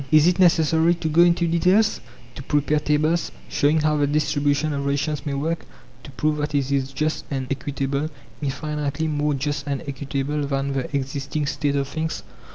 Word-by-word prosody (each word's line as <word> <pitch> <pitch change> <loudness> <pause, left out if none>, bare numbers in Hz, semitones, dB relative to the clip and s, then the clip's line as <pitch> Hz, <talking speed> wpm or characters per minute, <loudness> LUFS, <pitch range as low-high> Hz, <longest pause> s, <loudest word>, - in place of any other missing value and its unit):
Is 155 0 +6
it 180 +1 +3
necessary 165 -1 +4
to 170 -1 -3
go 160 +2 +4
into 175 0 +4
details, 180 +6 +3 0.3
to 120 - -8
prepare 150 +2 +1
tables, 155 +3 +1 0.2
showing 145 - +2
how 155 0 +2
the 145 -1 +2
distribution 150 0 +1
of 140 -1 -2
rations 150 +2 -1
may 140 - -1
work, 160 +4 -2 0.4
to - - -11
prove 150 +3 0
that 150 0 -2
it 140 -1 0
is 135 -1 0
just 155 +3 -1
and 135 -2 -2
equitable, 140 +1 -2 0.3
infinitely 150 +1 -2
more 150 -1 0
just 145 +1 -3
and 140 -1 -2
equitable 140 +1 -2
than 140 0 -1
the 140 +3 -3
existing 140 +2 -3
state 145 0 -1
of 140 -1 0
things? 160 +2 -3
150 Hz, 175 wpm, -23 LUFS, 140-155 Hz, 0.4 s, Is